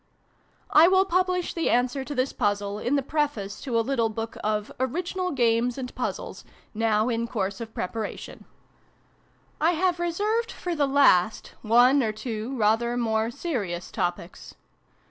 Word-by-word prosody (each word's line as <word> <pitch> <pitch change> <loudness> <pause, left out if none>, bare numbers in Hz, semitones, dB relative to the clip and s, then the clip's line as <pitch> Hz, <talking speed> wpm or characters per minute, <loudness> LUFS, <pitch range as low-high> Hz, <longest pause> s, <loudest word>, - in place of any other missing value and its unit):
I 320 +2 +7
will 380 +1 +4
publish 365 -1 0
the 335 - 0
answer 250 +3 +1
to 290 +2 -6
this 255 +1 0
puzzle 205 -2 -1
in 250 +6 0
the 280 - +1
Preface 275 -9 -2
to 245 -4 -1
a 225 - 0
little 235 -4 +1
book 225 +1 -5
of 210 0 -1
" - - -37
Original 355 +8 -2
Games 240 -3 +1
and 255 -2 -5
Puzzles," - - -5 0.3
now 220 0 +1
in 235 -1 -1
course 195 -2 -3
of 225 -1 -8
preparation. 220 +4 -5
b - - -17
xviii - - -36
PREFACE. 330 +2 +2
I - - -4
have 360 -2 +1
reserved, 420 +7 -1
for 355 - -4
the 295 -3 +1
last, 265 -8 +3
one 245 +5 +5
or 220 -3 0
two 220 +3 -5
rather 230 +2 +2
more 220 -1 0
serious 210 - -4
topics. 175 -3 -4
245 Hz, 165 wpm, -26 LUFS, 220-300 Hz, 0.3 s, I